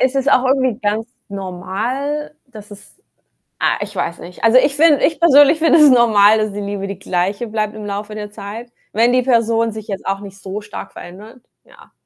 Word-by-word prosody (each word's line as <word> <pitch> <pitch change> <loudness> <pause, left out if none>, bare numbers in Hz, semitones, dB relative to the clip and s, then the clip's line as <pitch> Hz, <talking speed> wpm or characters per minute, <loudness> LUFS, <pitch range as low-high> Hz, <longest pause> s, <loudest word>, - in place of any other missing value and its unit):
Es 260 +1 +1
ist 270 +1 +1
auch 255 - +3
irgendwie 260 -4 +1
ganz 215 +1 -1 0.2
normal, 215 +11 -4
dass 215 -4 -13
es 205 0 -14 0.6
ah, - - +1
ich 205 0 -6
weiß 170 -2 -3
nicht. 175 +1 -12
Also, 225 +2 +5
ich 275 +2 +3
finde 300 -1 +4
ich 320 - -1
persönlich 290 -2 +5
finde 330 0 +4
es 300 -2 +7
normal, 220 -4 +5
dass 215 -1 -1
die 205 - -5
Liebe 200 -1 -5
die 195 -1 -7
Gleiche 195 +5 -2
bleibt 215 -1 -3
im 215 -1 -8
Laufe 205 +1 -6
der 210 -1 -7
Zeit, 215 +4 -9 0.2
wenn 235 +3 +2
die 255 - +3
Person 230 -2 +1
sich 220 -1 -9
jetzt 195 -2 -6
auch 195 0 -2
nicht 195 -1 -11
so 195 +2 -7
stark 210 0 -9
verändert, 215 +8 -12 0.2
ja. - - -20
215 Hz, 205 wpm, -17 LUFS, 200-255 Hz, 0.6 s, es